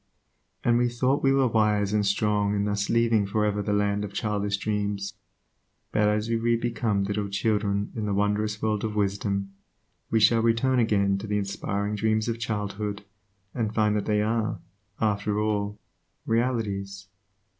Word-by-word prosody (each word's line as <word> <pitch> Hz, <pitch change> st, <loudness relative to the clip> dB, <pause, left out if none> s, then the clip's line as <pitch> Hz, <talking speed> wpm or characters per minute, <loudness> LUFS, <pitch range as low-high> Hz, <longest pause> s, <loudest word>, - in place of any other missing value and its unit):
And 120 Hz, 0 st, +3 dB
we 120 Hz, 0 st, +2 dB
thought 130 Hz, +4 st, +1 dB
we 135 Hz, -, +3 dB
were 135 Hz, -1 st, +3 dB
wise 105 Hz, -3 st, +2 dB
and 105 Hz, -1 st, +2 dB
strong 105 Hz, 0 st, +1 dB
in 100 Hz, 0 st, 0 dB
thus 100 Hz, -1 st, -1 dB
leaving 115 Hz, -3 st, +3 dB
for 105 Hz, +1 st, +1 dB
ever 105 Hz, 0 st, 0 dB
the 105 Hz, -, -2 dB
land 105 Hz, 0 st, +1 dB
of 100 Hz, -1 st, -6 dB
childish 105 Hz, -2 st, -1 dB
dreams, 100 Hz, -1 st, -2 dB, 0.8 s
but 105 Hz, 0 st, +2 dB
as 105 Hz, +1 st, +1 dB
we 115 Hz, 0 st, +1 dB
re 115 Hz, +1 st, +2 dB
become 115 Hz, -3 st, 0 dB
little 100 Hz, 0 st, -2 dB
children 100 Hz, 0 st, 0 dB
in 110 Hz, -2 st, -2 dB
the 100 Hz, -, 0 dB
wondrous 105 Hz, +1 st, 0 dB
world 105 Hz, -2 st, 0 dB
of 110 Hz, -1 st, -2 dB
wisdom, 100 Hz, -1 st, -1 dB, 0.6 s
we 115 Hz, -, +2 dB
shall 115 Hz, +2 st, +5 dB
return 115 Hz, +3 st, +2 dB
again 100 Hz, -4 st, +2 dB
to 110 Hz, -, -7 dB
the 105 Hz, 0 st, 0 dB
inspiring 100 Hz, +1 st, -2 dB
dreams 110 Hz, +1 st, +1 dB
of 115 Hz, -1 st, -2 dB
childhood 105 Hz, -2 st, -3 dB, 0.5 s
and 110 Hz, -3 st, -2 dB
find 105 Hz, -1 st, +2 dB
that 105 Hz, -, -1 dB
they 105 Hz, -1 st, +2 dB
are, 110 Hz, 0 st, -1 dB, 0.4 s
after 105 Hz, -1 st, 0 dB
all, 105 Hz, -1 st, -1 dB, 0.5 s
realities. 100 Hz, -5 st, -1 dB
105 Hz, 165 wpm, -26 LUFS, 100-110 Hz, 0.8 s, shall